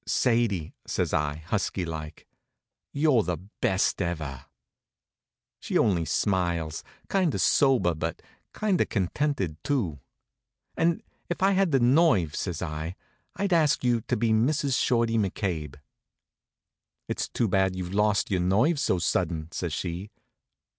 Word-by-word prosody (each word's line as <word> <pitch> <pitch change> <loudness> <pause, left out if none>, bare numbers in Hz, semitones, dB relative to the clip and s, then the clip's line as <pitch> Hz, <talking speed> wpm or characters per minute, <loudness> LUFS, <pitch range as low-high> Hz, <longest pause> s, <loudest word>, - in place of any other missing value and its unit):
"Sadie," 115 - +1
says - - -1
I, 75 -2 0
husky 95 -1 -1
like, 80 -1 -7 0.7
"you're 140 -5 +3
the 90 -3 -2
best 95 +2 -1
ever!" 80 -7 -4 1.1
She - - -1
only 90 -6 +2
smiles, 85 -3 -1 0.2
kind 185 -6 +1
of - - -2
sober, 130 -11 +3
but 80 +1 -4 0.3
kind 205 -5 0
of - - +1
contented, 95 - -1
too. 100 - -1 0.8
"And 165 0 +1 0.3
if 175 - -2
I 195 - +5
had 195 -1 +3
the 135 - +4
nerve," 120 - +3
says 90 -3 -3
I, 80 +2 -4 0.4
"I'd 200 -2 0
ask 155 -5 +3
you 120 -2 +2
to - - +1
be 115 +1 +1
Mrs. 135 +4 +2
Shorty 115 -2 +2
McCabe." 90 -8 -2 1.3
"It's - - -3
too 115 - 0
bad 95 -1 +2
you've 90 0 -5
lost 105 0 +2
your 95 -2 +1
nerve 110 - +2
so 95 - +1
sudden," 80 -1 -1
says 85 -2 -3
she. 90 +5 -4
95 Hz, 135 wpm, -27 LUFS, 85-130 Hz, 1.3 s, I